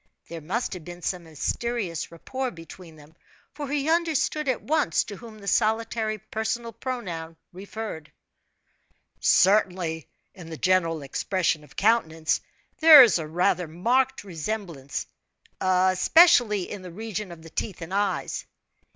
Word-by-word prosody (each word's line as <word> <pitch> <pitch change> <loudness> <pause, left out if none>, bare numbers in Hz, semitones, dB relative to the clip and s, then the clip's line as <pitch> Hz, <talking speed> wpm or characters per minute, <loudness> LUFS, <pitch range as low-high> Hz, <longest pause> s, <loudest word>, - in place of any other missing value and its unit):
There 170 -1 -7
must 200 +11 -2
have 180 -3 -8
been 175 +1 -10
some 180 -2 -3
mysterious 175 - -3
rapport 260 +10 -4
between 165 -2 -12
them, 150 +1 -17 0.4
for 295 -1 -6
he 285 +1 -1
understood 320 -2 +1
at 255 - -1
once 300 - +1
to 205 - -9
whom 225 0 -12
the 200 -1 -12
solitary 220 0 0
personal 220 +3 -4
pronoun 175 -11 -5 0.2
referred. 190 -5 -7 1.1
"Certainly, 180 -5 +2 0.3
in 175 -3 -11
the 160 - -7
general 165 -4 +1
expression 165 +2 -1
of 145 - -18
countenance 165 -8 +1 0.4
there 315 -4 +11
is 220 -7 +3
rather 175 +3 0
a - - -11
marked 240 +12 0
resemblance, 170 -7 -5 0.5
especially 195 - +4
in 205 - -6
the 180 -1 -9
region 210 0 -5
of 165 -2 -11
the 165 - -12
teeth 185 -1 -4
and 170 +3 -8
eyes." 200 -1 -1
190 Hz, 135 wpm, -25 LUFS, 165-230 Hz, 1.1 s, there